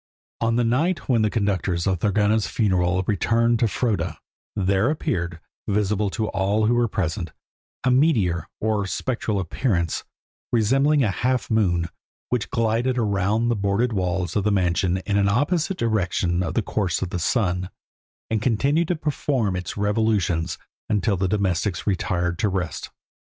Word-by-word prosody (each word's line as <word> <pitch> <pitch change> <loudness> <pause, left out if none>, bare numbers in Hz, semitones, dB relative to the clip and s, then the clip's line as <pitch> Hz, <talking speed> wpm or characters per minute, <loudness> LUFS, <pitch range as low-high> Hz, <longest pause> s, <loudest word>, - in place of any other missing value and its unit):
On 115 0 +1
the 120 - +2
night 155 +10 0
when 120 -4 +3
the 110 - +2
conductors 95 -5 0
of 95 -3 +1
Thorgunna's 105 +2 +2
funeral 95 -4 +1
returned 115 +3 +2
to 115 - +3
Froda, 100 -6 -1 0.4
there 100 +3 +2
appeared, 85 - -2 0.3
visible 105 0 +1
to 110 +2 -2
all 100 +2 +1
who 115 - +3
were 120 0 +2
present, 85 -5 -2 0.5
a 130 - +3
meteor, 115 - +2
or 105 -2 0
spectral 110 -1 -2
appearance, 85 - -1 0.5
resembling 135 +6 +3
a 105 - +1
half 125 +7 -1
moon, 90 -6 +2 0.4
which 125 -4 -1
glided 115 +1 0
around 105 +1 +1
the 120 - +2
boarded 100 +4 0
walls 90 -3 -1
of 105 - +1
the 105 - +2
mansion 90 -1 +1
in 100 -1 +1
an 100 0 +3
opposite 165 - +1
direction 95 - 0
to 90 -3 -1
the 110 - 0
course 95 -4 -1
of 90 - -5
the 90 - -2
sun, 90 -2 0 0.6
and 110 -2 +1
continued 140 +8 +1
to 180 - 0
perform 140 - -1
its 90 +1 -5
revolutions 105 -5 0 0.3
until 105 -1 +1
the 95 +1 0
domestics 95 -2 0
retired 90 -3 -1
to 105 - +2
rest. 95 -3 -3
105 Hz, 155 wpm, -23 LUFS, 90-115 Hz, 0.6 s, when